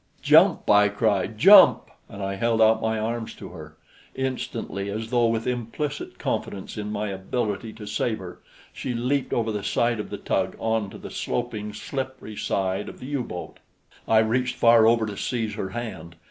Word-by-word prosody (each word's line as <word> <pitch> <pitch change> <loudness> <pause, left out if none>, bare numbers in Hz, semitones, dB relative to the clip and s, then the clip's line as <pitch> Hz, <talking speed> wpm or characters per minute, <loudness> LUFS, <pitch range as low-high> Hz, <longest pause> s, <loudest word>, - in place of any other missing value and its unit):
"Jump!" - - +5
I 105 0 +6
cried. 105 0 0
"Jump!" 195 - +7 0.2
And 100 0 -7
I 100 0 -2
held 115 +3 0
out 110 0 +5
my 110 0 0
arms 115 +1 -3
to - - -10
her. - - -11 0.4
Instantly 125 -6 -3
as 110 +2 -5
though 120 -2 +3
with 115 0 -1
implicit 125 +5 -4
confidence 95 - -4
in 105 -1 -4
my 105 0 -2
ability 105 +3 -3
to 110 - -10
save 110 +2 -1
her, 90 -1 -10 0.3
she 125 - -4
leaped 130 +4 -1
over 115 -1 0
the 105 -1 -3
side 120 -1 +1
of 105 - -5
the - - -5
tug - - -1
onto 110 -3 -2
the - - -9
sloping, 110 -4 -3
slippery 130 -1 -6
side 95 -2 -2
of - - -12
the - - -9
U 140 -1 -2
boat. 90 -6 -8 0.5
I 110 - +4
reached 125 +4 +2
far 115 -1 +6
over 115 -1 +3
to 105 -1 -5
seize 115 0 -2
her 95 - -4
hand. 95 -7 -7
110 Hz, 180 wpm, -25 LUFS, 105-120 Hz, 0.5 s, Jump